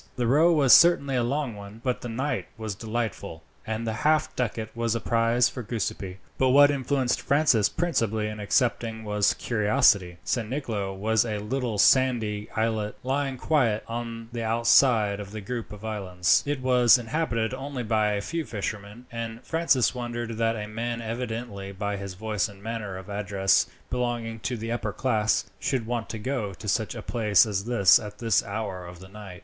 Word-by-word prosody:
The 125 Hz, -, -1 dB
row 150 Hz, +8 st, +4 dB
was 140 Hz, -6 st, +5 dB
certainly 140 Hz, -6 st, +6 dB
a 125 Hz, -, +2 dB
long 135 Hz, +1 st, -1 dB
one, 100 Hz, +2 st, -10 dB
but 125 Hz, -2 st, -1 dB
the 120 Hz, -, -6 dB
night 130 Hz, +6 st, -2 dB
was 110 Hz, -2 st, -4 dB
delightful, 110 Hz, -5 st, -4 dB, 0.2 s
and 110 Hz, +1 st, -3 dB
the 110 Hz, -, -1 dB
half 155 Hz, 0 st, +2 dB
ducat 115 Hz, -2 st, -3 dB
was 115 Hz, -1 st, 0 dB
a -, -, 0 dB
prize 115 Hz, +2 st, +2 dB
for 125 Hz, -, -6 dB
Giuseppi; 100 Hz, -4 st, -4 dB, 0.2 s
but 130 Hz, -, +3 dB
what 145 Hz, +2 st, +7 dB
influenced 135 Hz, -2 st, 0 dB
Francis 140 Hz, -7 st, +3 dB
principally 115 Hz, -, 0 dB
in 105 Hz, 0 st, -5 dB
accepting 115 Hz, +1 st, 0 dB
was 105 Hz, -1 st, +1 dB
curiosity. 105 Hz, -5 st, +2 dB
San 115 Hz, -3 st, -2 dB
Nicolo 115 Hz, -8 st, -3 dB
was 110 Hz, +3 st, +1 dB
a 110 Hz, -3 st, -3 dB
little 115 Hz, +1 st, -2 dB
sandy 110 Hz, -3 st, +3 dB
islet 110 Hz, -1 st, -1 dB
lying 135 Hz, +1 st, -1 dB
quite 120 Hz, -7 st, +1 dB
on 115 Hz, -1 st, -5 dB
the 120 Hz, -1 st, -4 dB
outside 115 Hz, -2 st, +3 dB
of 100 Hz, -1 st, -7 dB
the 110 Hz, +1 st, -7 dB
group 115 Hz, +3 st, -5 dB
of 105 Hz, +1 st, -9 dB
islands. 95 Hz, -5 st, +1 dB
It 145 Hz, -2 st, -1 dB
was 125 Hz, -1 st, +5 dB
inhabited 115 Hz, -2 st, -1 dB
only 135 Hz, -1 st, -5 dB
by 110 Hz, -2 st, +1 dB
a 100 Hz, -, -1 dB
few 165 Hz, +9 st, -3 dB
fishermen; 105 Hz, 0 st, -6 dB
and 115 Hz, 0 st, -6 dB
Francis 160 Hz, -9 st, +2 dB
wondered 120 Hz, -2 st, -4 dB
that 115 Hz, 0 st, +1 dB
a 105 Hz, -1 st, -5 dB
man, 115 Hz, +2 st, -3 dB
evidently 115 Hz, -4 st, -5 dB
by 100 Hz, +1 st, -3 dB
his 100 Hz, -1 st, -7 dB
voice 105 Hz, +1 st, -2 dB
and 100 Hz, -1 st, -15 dB
manner 110 Hz, -4 st, -4 dB
of 95 Hz, 0 st, -10 dB
address 100 Hz, -1 st, +1 dB, 0.2 s
belonging 120 Hz, -2 st, -2 dB
to 125 Hz, +2 st, -3 dB
the 115 Hz, +1 st, -5 dB
upper 110 Hz, -3 st, -2 dB
class, 110 Hz, 0 st, +1 dB
should 130 Hz, -5 st, -1 dB
want 120 Hz, -1 st, -3 dB
to 110 Hz, -, -4 dB
go 110 Hz, -4 st, -3 dB
to 105 Hz, -, -10 dB
such 110 Hz, +2 st, 0 dB
a -, -, -7 dB
place 105 Hz, -5 st, +3 dB
as 100 Hz, -2 st, -2 dB
this 115 Hz, -7 st, +5 dB
at 105 Hz, -1 st, -9 dB
this 115 Hz, -2 st, +2 dB
hour 100 Hz, -4 st, -5 dB
of 90 Hz, 0 st, -10 dB
the 95 Hz, -, -12 dB
night. 95 Hz, -3 st, -10 dB
115 Hz, 185 wpm, -26 LUFS, 105-125 Hz, 0.2 s, what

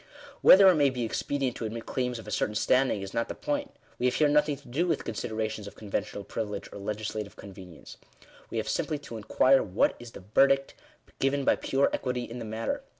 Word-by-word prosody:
Whether 195 Hz, +1 st, +9 dB
it 185 Hz, -, +8 dB
may 145 Hz, -2 st, +4 dB
be 125 Hz, -2 st, -3 dB
expedient 130 Hz, +3 st, -2 dB
to 115 Hz, -, -4 dB
admit 115 Hz, +1 st, -5 dB
claims 125 Hz, -1 st, -2 dB
of 115 Hz, -, -10 dB
a -, -, -6 dB
certain 105 Hz, +1 st, -1 dB
standing, 125 Hz, -2 st, +2 dB
is 95 Hz, -, -7 dB
not 115 Hz, -, 0 dB
the -, -, -6 dB
point. 290 Hz, -1 st, -3 dB, 0.2 s
We 125 Hz, -, +2 dB
have 125 Hz, -, 0 dB
here 150 Hz, -, +4 dB
nothing 150 Hz, 0 st, +2 dB
to -, -, -18 dB
do 150 Hz, +9 st, 0 dB
with -, -, 0 dB
considerations 110 Hz, -1 st, -4 dB
of -, -, -10 dB
conventional 100 Hz, -1 st, -4 dB
privilege 105 Hz, -1 st, -5 dB
or -, -, -8 dB
legislative 105 Hz, 0 st, -4 dB
conve 95 Hz, -2 st, -11 dB
nience. 85 Hz, -3 st, -13 dB, 0.5 s
We -, -, -4 dB
have -, -, -2 dB
simply 150 Hz, -, -1 dB
to 130 Hz, -5 st, -9 dB
inquire 130 Hz, +5 st, +4 dB
what 95 Hz, +1 st, +1 dB
is 120 Hz, -1 st, -11 dB
the 95 Hz, -, -11 dB
verdict 135 Hz, 0 st, +4 dB, 0.5 s
given 135 Hz, 0 st, +1 dB
by -, -, +4 dB
pure 135 Hz, +1 st, +1 dB
equity 125 Hz, -1 st, -2 dB
in 120 Hz, +1 st, -7 dB
the 115 Hz, -, -6 dB
matter. 110 Hz, +1 st, -3 dB
120 Hz, 215 wpm, -28 LUFS, 105-135 Hz, 0.5 s, Whether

